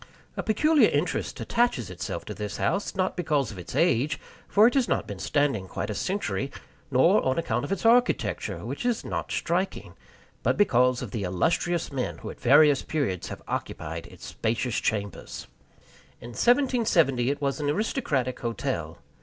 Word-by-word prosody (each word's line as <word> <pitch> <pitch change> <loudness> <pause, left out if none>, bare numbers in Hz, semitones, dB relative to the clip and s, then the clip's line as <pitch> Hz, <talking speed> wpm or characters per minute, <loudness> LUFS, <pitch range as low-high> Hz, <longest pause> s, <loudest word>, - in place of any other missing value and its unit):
A - - -2
peculiar 280 +3 +4
interest 150 +4 -1
attaches 185 - 0
itself 90 - -5
to - - -6
this 105 -1 -5
house, 200 +1 -1
not 185 0 0
because 150 - 0
of 100 - -9
its 90 - -8
age, 145 -3 +2 0.3
for 210 +2 +5
it 245 - +5
has 265 -4 +2
not - - 0
been - - -7
standing 140 -10 0
quite 100 - -4
a - - -2
century; 135 - -2 0.4
nor 155 +10 +4
on 130 - 0
account 120 -8 -1
of - - -7
its 195 +2 -2
architecture, 245 +2 +2
which - - -4
is 245 -2 0
not - - -4
striking 180 +3 -2 0.5
but - - +1
because 125 -10 +3
of 115 - -7
the 110 - -3
illustrious 160 - 0
men 130 -3 -3
who - - -7
at - - -14
various 145 +2 +6
periods 130 - -2
have - - -8
occupied 80 +1 -4
its - - -13
spacious 115 +1 -1
chambers. 100 -3 -3 0.7
In 120 - -9
1770 215 - +2
it 145 +1 -1
was 140 0 -1
an 145 -1 -1
aristocratic 145 - -1
hotel. 115 -1 -3
145 Hz, 170 wpm, -26 LUFS, 120-195 Hz, 0.7 s, various